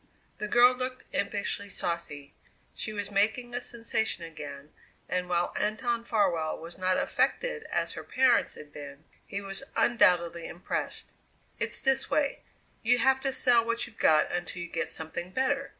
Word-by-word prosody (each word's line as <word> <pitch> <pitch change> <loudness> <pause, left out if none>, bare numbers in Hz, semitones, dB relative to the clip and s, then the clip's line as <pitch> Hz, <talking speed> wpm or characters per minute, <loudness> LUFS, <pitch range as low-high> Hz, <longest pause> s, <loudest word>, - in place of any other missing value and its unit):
The 210 - -2
girl 240 +3 +7
looked 255 0 -3
impishly 200 0 -2
saucy. 150 -6 -4 0.4
She 215 - -4
was 205 -1 -4
making 220 +5 +1
a 245 - -2
sensation 225 -6 -1
again 150 -3 -8 0.3
and, 180 0 -1
while 175 0 +1
Anton 230 +2 0
Farwell 180 -9 +1
was 165 +1 -8
not 185 0 +2
affected - - 0
as - - -1
her - - -7
parents 255 -2 +3
had 150 -1 -12
been, 140 0 -9 0.2
he 200 - -4
was 195 +2 -6
undoubtedly 170 -7 +3
impressed. 175 - -4 0.5
"It's - - -1
this 270 0 +2
way: 285 -2 +1 0.4
You 245 +2 +4
have 265 +2 +3
to 270 0 0
sell 245 -3 +4
what 235 0 -1
you've 230 - -15
got 155 -1 +4
until 175 0 -3
you 175 - -7
get - - -2
something 160 +2 -4
better. 270 +6 0
205 Hz, 160 wpm, -29 LUFS, 170-245 Hz, 0.5 s, girl